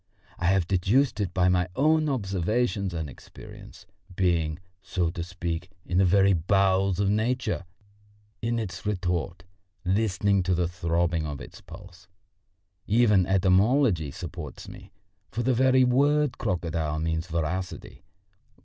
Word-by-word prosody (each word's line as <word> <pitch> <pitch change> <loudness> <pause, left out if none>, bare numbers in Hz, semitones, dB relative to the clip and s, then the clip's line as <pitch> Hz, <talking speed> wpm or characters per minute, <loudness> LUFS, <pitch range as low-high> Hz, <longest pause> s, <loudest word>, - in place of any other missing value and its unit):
I 85 - -2
have 95 -1 +2
deduced 110 +7 +2
it 100 -4 -1
by 90 -1 +2
my 90 0 +2
own 155 +2 +3
observation 100 -2 -1
and 80 -2 -3
experience, 65 - -13 0.3
being, 85 -4 +1 0.2
so 90 -3 -1
to 85 -1 -5
say, 85 -1 -4 0.2
in 90 - 0
the 95 - +5
very 95 +2 +4
bowels 95 +2 +2
of 100 - +2
Nature, 110 -1 -1 0.8
in 115 +1 -1
its 110 -5 -5
retort, 90 -3 -2 0.4
listening 100 0 +1
to 90 0 0
the 85 0 0
throbbing 85 -1 -1
of 75 -2 -5
its - - -11
pulse. 90 +1 -13 0.8
Even 105 -4 +4
etymology 95 - +3
supports 70 - -8
me, - - -12 0.4
for 120 - -3
the 130 +2 +2
very 130 +1 +4
word 145 +3 +2
crocodile 80 -3 -2
means 80 +1 -2
voracity. 85 +3 -4
95 Hz, 130 wpm, -26 LUFS, 85-110 Hz, 0.8 s, the